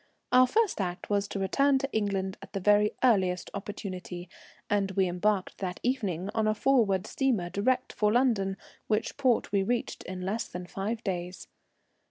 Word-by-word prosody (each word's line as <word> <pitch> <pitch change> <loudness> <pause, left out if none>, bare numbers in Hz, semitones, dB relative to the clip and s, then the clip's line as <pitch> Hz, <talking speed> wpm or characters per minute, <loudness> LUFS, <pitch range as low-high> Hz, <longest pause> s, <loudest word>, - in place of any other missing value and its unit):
Our 255 0 +7
first 430 - +1
act 180 +1 -4
was 200 0 +1
to - - -5
return 275 +9 +3
to 275 0 -3
England 195 -3 -1
at 195 0 -12
the 195 - -1
very 210 +2 +3
earliest 190 -7 +2
opportunity, 185 -3 -6 0.4
and 205 -2 +1
we 190 -1 +2
embarked 185 +2 0
that 180 -2 -4
evening 205 -7 -1
on 220 -1 +1
a 215 - +2
Forwood 215 -7 +2
steamer 225 -11 0
direct 255 +5 0
for 210 -1 +2
London, 215 -6 +2 0.3
which 215 0 0
port 260 -4 +1
we 200 -1 +2
reached 235 +4 -2
in 185 0 -6
less 205 +5 -2
than 180 0 -7
five 205 +5 -4
days. 180 -2 -4
200 Hz, 170 wpm, -29 LUFS, 190-230 Hz, 0.4 s, Our